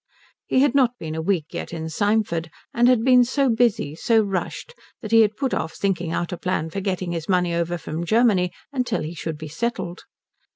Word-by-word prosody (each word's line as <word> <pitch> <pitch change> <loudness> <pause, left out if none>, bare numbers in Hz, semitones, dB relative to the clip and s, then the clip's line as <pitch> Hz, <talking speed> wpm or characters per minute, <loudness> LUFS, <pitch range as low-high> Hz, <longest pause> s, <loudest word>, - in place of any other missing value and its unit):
He 260 - +3
had 280 -2 +3
not 255 -3 +3
been 155 -1 -6
a 160 - -3
week 170 -2 0
yet - - -5
in 160 -1 -5
Symford, 185 -2 0 0.2
and 240 +1 +4
had 250 -3 +4
been 250 -1 +6
so 265 +2 +1
busy, 225 -9 +1
so 225 +7 +2
rushed, 195 - -4 0.3
that 215 - -6
he 225 0 +7
had 215 -1 +2
put 270 -2 -1
off 160 0 -2
thinking 180 -4 -1
out 175 +1 -2
a - - -4
plan 160 -3 -2
for 195 - -3
getting 185 -2 -2
his 165 0 -4
money 180 -2 +2
over 170 +1 -1
from 160 0 -5
Germany 200 -3 +3 0.2
until 250 - -1
he 155 +2 -5
should 160 -2 -5
be 155 +1 -7
settled. 175 +1 -4
190 Hz, 210 wpm, -23 LUFS, 170-235 Hz, 0.3 s, he